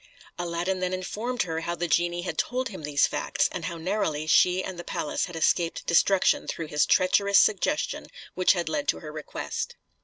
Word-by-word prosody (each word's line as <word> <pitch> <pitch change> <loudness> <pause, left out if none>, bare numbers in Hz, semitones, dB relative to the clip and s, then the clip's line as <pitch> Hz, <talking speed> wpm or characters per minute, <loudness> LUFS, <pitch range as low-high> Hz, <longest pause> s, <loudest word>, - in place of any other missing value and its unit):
Aladdin 175 +2 -2
then 185 0 -1
informed 220 +7 -2
her 165 -2 -3
how 170 +1 -3
the 175 +1 -2
genie 175 +1 +1
had 180 - -4
told 255 0 -1
him 190 -6 -8
these 145 -1 +2
facts, - - 0
and - - -5
how 170 - -4
narrowly 160 -4 -1
she 180 +3 +4
and 185 -2 -6
the - - -5
palace 150 - -2
had 175 - -10
escaped 165 +1 +1
destruction 185 +3 +3
through 165 -2 -4
his 150 -1 +2
treacherous 200 +2 +4
suggestion 215 +9 +2 0.3
which 185 +1 +4
had 175 -3 -2
led 290 -1 -2
to - - 0
her 155 - -8
request. 155 -1 -5
175 Hz, 190 wpm, -26 LUFS, 165-190 Hz, 0.3 s, she